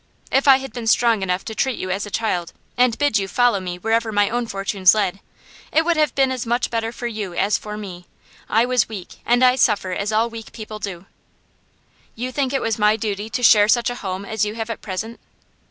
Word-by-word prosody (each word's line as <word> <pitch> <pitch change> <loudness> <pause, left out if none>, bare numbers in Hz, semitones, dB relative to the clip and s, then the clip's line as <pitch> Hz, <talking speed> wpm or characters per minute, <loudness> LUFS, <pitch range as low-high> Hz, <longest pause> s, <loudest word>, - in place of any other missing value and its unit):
If 270 +2 +2
I 270 -1 +8
had 270 -3 -8
been 235 -2 -5
strong 230 -2 +3
enough 180 0 -1
to 220 - -5
treat 260 +3 -1
you 185 - -4
as 200 +2 -2
a - - -7
child, 185 -6 -2 0.2
and 245 -2 +2
bid 290 -7 +2
you 195 - -3
follow 245 0 +2
me 180 -1 -5
wherever 225 +4 0
my 205 -1 +2
own 240 0 -1
fortunes 195 -1 +3
led, 200 -2 -1 0.5
it 320 +1 +3
would 345 0 +2
have 305 -4 +1
been 270 -1 +3
as 255 -2 -3
much 240 +1 -1
better 225 -1 -1
for 240 - -8
you 210 -6 -4
as 200 +3 +1
for 210 0 -5
me. 180 -4 -9 0.4
I 225 +2 +3
was 250 -3 +1
weak, 195 -5 -9
and 245 +1 +3
I 250 0 +5
suffer 210 -7 +2
as 200 +3 -2
all 220 +2 +2
weak 230 -1 -10
people 215 -1 -8
do.' 190 -3 -6 1.1
'You 250 +3 -4
think 265 -1 -1
it 275 - -1
was 225 -1 -1
my 210 +1 +4
duty 210 -1 -3
to 245 +3 -3
share 210 -3 +7
such 240 +2 +2
a - - -5
home 190 0 -4
as 220 0 -1
you 210 +1 -2
have 225 0 -4
at 225 - -6
present? 220 +4 -5
220 Hz, 235 wpm, -21 LUFS, 200-240 Hz, 1.1 s, I